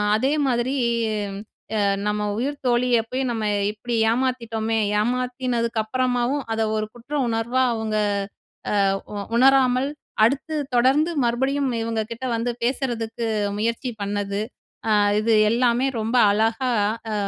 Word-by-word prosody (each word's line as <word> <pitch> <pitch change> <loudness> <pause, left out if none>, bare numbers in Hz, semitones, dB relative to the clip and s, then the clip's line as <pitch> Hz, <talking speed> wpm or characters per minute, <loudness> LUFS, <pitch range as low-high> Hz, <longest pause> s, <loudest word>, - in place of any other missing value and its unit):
அதே 265 +7 +1
மாதிரி 250 +2 0 1.0
அ - - +1 0.3
நம்ம 210 0 0 0.2
உயிர் 280 +5 -1
தோழிய 240 -1 +3
போயி, 260 +1 -1
நம்ம 220 -2 -2 0.3
இப்படி 235 +2 -4 0.2
ஏமாத்திட்டோமே! 230 -3 -1 0.2
ஏமாத்தினதுக்கு 245 -1 -1
அப்புறமாவும், 255 +3 0
அதை 225 - 0
ஒரு 215 - -1
குற்ற 240 +5 -11
உணர்வா 235 +3 0
அவுங்க 220 -1 -2 0.9
அ - - +3 0.3
உ - - -4 0.2
உணராமல், 260 0 +4 0.4
அடுத்து 280 +6 0 0.2
தொடர்ந்து 275 +7 +3
மறுபடியும் 265 +4 0
இவங்க 225 -1 -1
கிட்ட 235 +3 -7
வந்து 240 +1 -1
பேசறதுக்கு 235 -3 -2 0.3
முயற்சி 230 +3 -1
பண்ணது". 200 0 -2 0.5
அ - - +4 0.3
இது 225 0 +2 0.2
எல்லாமே 240 +2 +2
ரொம்ப 225 +3 -1 0.2
அழகா 225 +4 +1 0.4
அ, - - -1
240 Hz, 120 wpm, -23 LUFS, 225-255 Hz, 1.0 s, உணராமல்